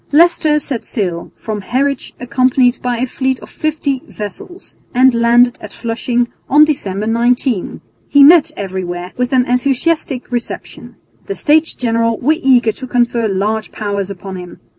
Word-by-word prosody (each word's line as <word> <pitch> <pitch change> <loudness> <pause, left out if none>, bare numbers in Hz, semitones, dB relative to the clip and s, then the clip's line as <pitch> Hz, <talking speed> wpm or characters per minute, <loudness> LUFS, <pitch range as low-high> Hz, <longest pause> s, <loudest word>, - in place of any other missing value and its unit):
Leicester 315 -1 +4
set 275 -5 -3
sail 180 -7 -3
from 215 -2 -5
Harwich 270 +5 -2
accompanied 255 0 +2
by 245 -1 -1
a 250 - 0
fleet 260 0 -2
of - - -12
fifty 295 -4 -2
vessels 210 - -9 0.2
and 260 +1 +5
landed 240 +1 +3
at - - -9
Flushing 240 +1 -1 0.2
on 300 +2 +6
December 210 -9 -2
19. 235 -1 0 0.3
He 285 -1 +6
met 320 +1 +7
everywhere 180 -2 -5
with 250 0 -1
an 255 -2 +3
enthusiastic 265 +2 0
reception. 240 -1 -6 0.3
The 400 - -3
States 315 +1 +2
General 230 -1 0
were 310 +5 +1
eager 245 -4 +4
to 260 +4 -9
confer 240 -2 +1
large 210 +2 -2
powers 200 -2 -3
upon 195 0 -7
him. 180 -1 -10
245 Hz, 150 wpm, -16 LUFS, 220-275 Hz, 0.3 s, met